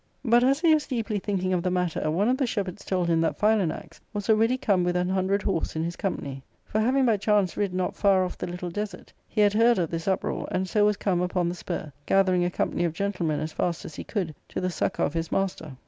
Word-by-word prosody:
But, 240 +1 +5
as 275 +4 +3
he 330 -2 +5
was 305 -1 +1
deeply 225 -5 -2
thinking 185 -2 -1
of 180 - +1
the 180 - 0
matter, 180 -3 -1
one 185 +7 +1
of 255 +1 +2
the 265 - +1
shepherds 195 -6 -3
told 180 -2 0
him 165 -1 +2
that 165 - 0
Philanax 210 -6 0
was 205 +1 0
already 225 +4 +3
come 195 -7 +2
with 175 0 0
an 180 0 +1
hundred 190 +2 +1
horse 180 -6 -1
in 160 - -1
his 170 +1 -3
company. 140 -8 -4 0.2
For 215 - -1
having 260 +4 +3
by 225 -3 +3
chance 205 -2 +1
rid 200 -2 0
not 180 0 -2
far 195 -2 +3
off 180 - -5
the - - -5
little 180 0 -5
desert, 205 0 -6
he 215 - 0
had 205 -1 +4
heard 230 +2 +4
of 170 -4 -1
this 165 +1 -4
uptoar, 190 -1 -1
and 185 +1 -1
so 205 +2 +3
was 210 -1 +2
come 180 -3 0
upon 180 -1 0
the - - -2
spur, 170 -4 -5
gathering 185 -2 +3
a 175 - +1
company 175 - -1
of 170 -2 0
gentle 185 -1 -2
men 150 -1 0
as 155 +1 -4
fast 170 -2 -2
as 155 - -8
he - - -6
could, 185 -8 -3 0.2
to - - -3
the 185 0 -1
succour - - 0
of - - -3
his 165 -1 -3
master. 165 -8 -2
185 Hz, 255 wpm, -26 LUFS, 175-210 Hz, 0.2 s, But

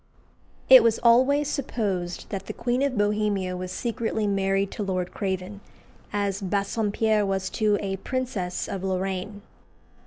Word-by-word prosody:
It 260 -1 +10
was 225 -1 +3
always 260 +5 +4
supposed 200 - -3
that 195 -1 -5
the - - -4
Queen 245 +2 0
of 275 -4 0
Bohemia 205 -3 0
was 180 0 -5
secretly 225 0 -2
married 195 0 0
to - - -5
Lord 185 -3 -2
Craven, 195 0 -4 0.5
as 200 -1 -1
Bassompierre 210 +2 0
was 195 -1 -1
to 210 -2 +2
a 195 -1 -3
princess 205 -5 -3
of 190 -1 -5
Lorraine. 190 +2 -3
200 Hz, 135 wpm, -25 LUFS, 190-225 Hz, 0.5 s, It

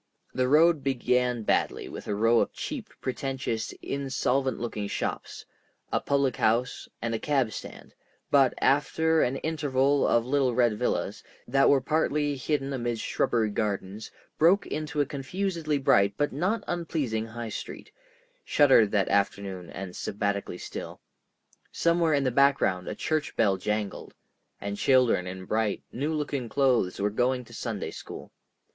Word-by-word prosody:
The 130 0 +1
road 155 +1 +4
began 125 -2 +1
badly - - 0
with - - -8
a 105 - -1
row 115 +2 +4
of - - 0
cheap, 260 -8 -5
pretentious, 130 -3 -3
insolvent 135 -1 -1
looking 110 -3 -3
shops, - - -4 0.5
a - - +2
public 140 -3 0
house, 120 +3 0
and 115 0 -1
a 110 - -1
cab 135 -5 +1
stand, - - -9 0.4
but, 135 -3 +4
after 160 +3 +2
an 125 - +1
interval 140 -2 +1
of 120 0 +2
little 130 -2 +1
red 120 -4 +2
villas - - -1 0.3
that 135 +2 +4
were 140 -2 +4
partly 150 0 0
hidden 140 0 -2
amidst 120 -3 -2
shrubbery 110 -3 +1
gardens, 105 0 -3 0.3
broke 185 +6 +5
into 150 -1 -2
a - - +2
confusedly 155 +3 -2
bright 100 -7 +3
but 145 -2 0
not 185 +11 0
unpleasing 150 -10 -2
High 115 0 -6
Street, - - -7 0.5
shuttered 135 -7 +5
that 100 -2 +1
afternoon 100 -2 -1
and 95 -2 -7
sabbatically 100 -3 -2
still. - - -7 0.7
Somewhere 170 -2 +2
in 140 - +1
the 130 - +1
background 125 -9 +2
a - - -4
church 155 -1 -2
bell 100 -4 +3
jangled, 105 +1 -3 0.4
and 100 0 -4
children 125 -9 +3
in 95 0 -7
bright, 110 +1 -1
new 145 +5 -2
looking 140 -5 -3
clothes 125 -8 +1
were 105 +1 +1
going 125 +3 0
to - - -15
Sunday - - -4
school. - - -9
130 Hz, 150 wpm, -27 LUFS, 110-145 Hz, 0.7 s, broke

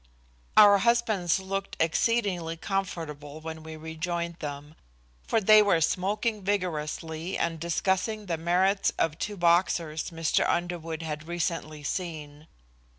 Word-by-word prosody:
Our 205 -2 +8
husbands 215 -6 +2
looked 195 +1 -4
exceedingly 175 -1 +1
comfortable 160 -6 -4
when 160 0 -7
we 160 0 -8
rejoined 170 +2 -4
them, 145 0 -6 0.5
for 225 - +2
they 215 +1 +7
were 200 -5 +3
smoking 205 +6 0
vigorously 165 -3 -2
and 165 -1 -1
discussing 190 +6 -1
the 170 -3 -2
merits 185 +4 +2
of 165 0 0
two 210 -1 -3
boxers 170 -2 +2
Mr. 165 -2 +1
Underwood 165 -2 -2
had 155 0 -5
recently 165 -3 -3
seen. 155 -3 -5
170 Hz, 120 wpm, -27 LUFS, 160-195 Hz, 0.5 s, Our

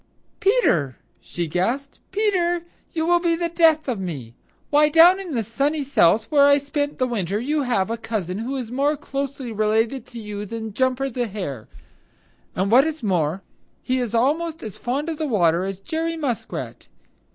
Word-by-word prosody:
"Peter!" 385 - +2 0.2
she 175 - -4
gasped. 235 - -2
"Peter, 365 -4 +1 0.3
you 320 -1 -1
will 345 +1 +4
be 340 -1 +1
the 340 0 -2
death 325 -3 +3
of 240 -6 -1
me. 140 -11 -6 0.4
Why, 300 +1 +5
down 335 +5 +7
in 365 -5 -6
the 230 - 0
Sunny 280 +7 -1
South, 220 -6 +3
where 285 -2 +6
I 285 0 +6
spent 285 +1 -2
the 255 - +1
winter, 205 -5 -2
you 295 +5 0
have 225 -6 0
a 230 - -2
cousin 205 -5 -3
who 250 +5 -3
is 245 -4 -5
more 285 +4 +1
closely 275 -3 -4
related 220 +4 0
to 240 - -9
you 210 -1 -6
than 220 0 -6
Jumper 260 +3 +1
the 245 0 -2
Hare. 180 - -6 0.9
And 190 +3 0
what 265 +6 +6
is 315 -4 -5
more, 180 -2 0 0.4
he 255 0 0
is 240 -2 -2
almost 315 +7 0
as 215 -4 -7
fond 275 +6 -2
of 320 -2 -4
the 310 - -1
water 175 - +2
as 195 -1 -4
Jerry 325 - -3
Muskrat. 270 -8 -4
255 Hz, 180 wpm, -23 LUFS, 210-305 Hz, 0.9 s, down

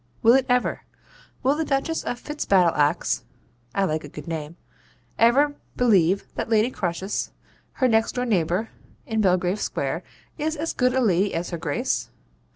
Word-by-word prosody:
Will 230 - +7
it 265 0 +3
ever? 250 0 +1 0.6
Will 265 +2 +4
the 320 - 0
Duchess 295 +3 -1
of 245 - -3
Fitzbattleaxe 175 - +1 0.5
(I 195 - +2
like 155 -3 -1
a 145 - -9
good - - -10
name) 160 0 -5 0.6
ever 275 +6 +4 0.2
believe 195 -6 +3
that - - -4
Lady 225 +2 +3
Croesus, 185 +1 -2 0.4
her 255 - +2
next 225 -1 +2
door 250 0 -1
neighbour 190 0 0 0.4
in 220 -1 0
Belgrave 185 0 +2
Square, - - -2 0.4
is 310 +1 -1
as 320 +2 -3
good 250 0 +1
a 260 - +3
lady 195 -3 +2
as 170 +2 -3
her 170 - -4
Grace? 165 - -1
220 Hz, 160 wpm, -24 LUFS, 175-255 Hz, 0.6 s, Will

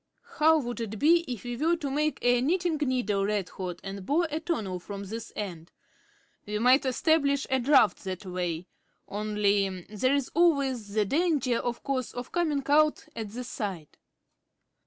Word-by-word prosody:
How 320 +1 +5
would 240 -4 -3
it 220 -1 -4
be 335 +7 +4
if 240 - -5
we 245 0 -4
were 325 +5 +2
to 290 -5 -4
make 300 +2 0
a 245 0 +4
knitting 340 +3 +1
needle 250 -8 0
red 205 -2 -1
hot 180 -2 -6
and 195 0 -6
bore 325 - +1
a 310 - -1
tunnel 220 - -3
from 200 +2 -7
this 225 +3 -7
end? 175 -5 -6 0.8
We 210 0 -2
might 255 +5 +4
establish 280 +1 +2
a 265 - +3
draught 260 -3 +4
that 185 +1 -5
way. 180 -2 -3 0.4
Only 205 -2 0
there's 255 +5 +1
always 275 -10 +1
the 215 -1 +3
danger, 280 - +1
of 240 -1 -3
course, 260 -3 -2
of 245 0 -6
coming 310 -5 0
out 300 +2 +3
at 220 -2 -5
the 245 +4 -6
side." 195 - -5
245 Hz, 165 wpm, -28 LUFS, 205-295 Hz, 0.8 s, How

